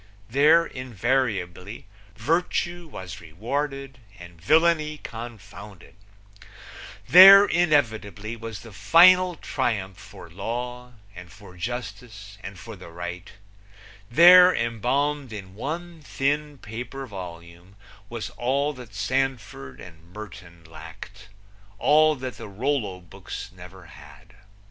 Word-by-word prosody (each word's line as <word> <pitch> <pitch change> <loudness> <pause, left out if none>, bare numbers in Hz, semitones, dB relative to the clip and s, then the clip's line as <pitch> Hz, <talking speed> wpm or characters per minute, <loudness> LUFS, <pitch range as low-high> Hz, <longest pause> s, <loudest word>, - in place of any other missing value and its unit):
There, 155 +6 +5
invariably 115 - -3 0.3
virtue 175 +1 -2
was 95 - -9
rewarded 135 - -5 0.2
and 85 -2 -14
villainy 155 - +2
confounded; 105 - -11 1.1
there, 195 +2 +10
inevitably 115 - 0
was 115 -4 -8
the 115 - -13
final 180 - +5
triumph 105 - -3
for 95 -1 -13
law 120 +7 -6 0.2
and 90 0 -12
for 100 -2 -15
justice 110 0 -7
and 95 -1 -8
for 115 +5 -10
the 90 -3 -13
right; 90 +2 -8 0.8
there 180 +6 +8
embalmed 130 +4 -1
in 95 -3 -9
one 165 - -6
thin 145 +1 -2
paper 125 +4 -8
volume, 90 -3 -11 0.3
was 115 -2 -6
all 140 +4 -1
that 120 -6 -13
Sandford 110 - -3
and 85 -1 -14
Merton 90 -5 -11
lacked; 80 +6 -12 0.5
all 155 +5 +4
that 130 -2 -7
the - - -8
Rollo 105 -4 -2
books 85 - -9
never 90 0 -13
had. 75 +4 -16
115 Hz, 105 wpm, -24 LUFS, 95-140 Hz, 1.1 s, there